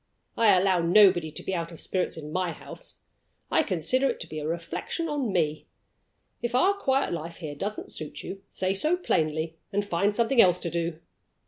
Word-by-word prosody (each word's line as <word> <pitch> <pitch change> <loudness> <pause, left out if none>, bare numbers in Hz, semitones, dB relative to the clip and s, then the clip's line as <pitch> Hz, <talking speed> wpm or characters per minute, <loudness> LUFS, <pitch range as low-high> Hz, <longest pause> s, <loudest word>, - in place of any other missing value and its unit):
I 210 -5 +5
allow 185 -1 +3
nobody 175 -1 +5
to 150 - -8
be 190 - -3
out 170 -1 -2
of 165 - -10
spirits 185 -3 -2
in 150 -1 -7
My 180 0 -1
house. - - -9 0.5
I - - +4
consider 255 - +1
it - - -3
to - - -5
be 155 - -5
a 150 - -4
reflection 170 - -3
on 285 -7 -1
Me. 155 -4 0 0.7
If 240 0 -2
our 375 +10 +5
quiet 275 - 0
life 165 0 -5
here 155 -4 -6
doesn't 205 +9 -5
suit 155 - -7
you, 195 0 -7
say 185 0 -1
so 305 - +2
plainly, 160 - 0
and 205 0 0
find 200 +2 +1
something 235 +2 +4
else 180 -1 +4
to 170 - -3
do. 170 -1 -2
185 Hz, 195 wpm, -27 LUFS, 165-220 Hz, 0.7 s, I